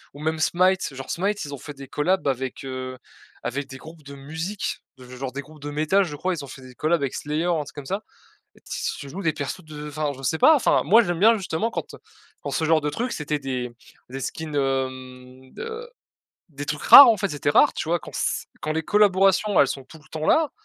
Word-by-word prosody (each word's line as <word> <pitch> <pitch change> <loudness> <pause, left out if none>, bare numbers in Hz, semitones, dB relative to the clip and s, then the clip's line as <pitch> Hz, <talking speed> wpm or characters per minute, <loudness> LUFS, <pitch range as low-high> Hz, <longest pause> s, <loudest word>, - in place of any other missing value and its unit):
ou - - -10
ou - - -8
même 160 0 -1
Smite. 185 -1 +2
Genre 135 0 -8
Smite, 200 0 -1
ils 145 - -7
ont 140 - -7
fait 145 +2 -9
des 135 0 -10
collabs 180 +5 0
avec, 130 -1 -2
heu, 130 -1 -5 0.5
avec 135 +3 -3
des 135 - -8
groupes 160 +2 -13
de 140 0 -10
musique. 160 +8 -4 0.2
Ge 125 0 -12
genre 130 0 -4
des 140 - -5
groupes 150 +1 -16
de 145 - -5
métal, 155 +7 +2
je 150 -4 -6
crois 185 +5 -1
ils 165 - -5
ont - - -13
fait 130 0 -11
des 130 0 -12
collabs 160 +3 +1
avec 140 -2 -2
Slayer 150 +3 -2
ou 175 - +2
un - - -2
truc 145 - -13
comme 145 -2 -8
ça 195 +7 -2 0.6
et - - -20
t - - -55
s - - -2
tu 140 - -8
joues 195 +8 -6
des 165 -3 +1
persos 145 +6 -5
de 150 -1 -8
enfin 150 0 -2
je 135 - -11
sais 160 +4 0
pas 315 - +7
enfin, 270 - +3
moi 215 +11 +6
j'aime 175 -3 -2
bien 225 +3 +6
justement 195 +2 -2
quand, - - -5
heu, - - -11 0.4
quand - - -4
ce 160 - -1
genre 160 0 +4
de 150 - -1
truc 240 +9 -3
c'était 150 0 -2
des 130 -3 -4 0.4
des 135 +1 -6
skins, 155 +3 -5
hem, 130 -1 -3
de 465 +1 -7 0.6
des 145 -1 -7
trucs 150 0 -3
rares, 280 -2 +12
en 225 - +5
fait, 200 0 -1
c'était 145 -1 -1
rare, - - +5
tu - - -4
vois? 170 +1 +2
Quand - - -10
s - - -2
quand 155 - -2
les 160 +1 -1
collaborations 195 +1 +3
elles 140 - +4
sont 135 0 -5
tout 160 - -14
le 155 - -22
temps 155 0 -4
là, 315 -2 +3
150 Hz, 255 wpm, -24 LUFS, 135-185 Hz, 0.6 s, rares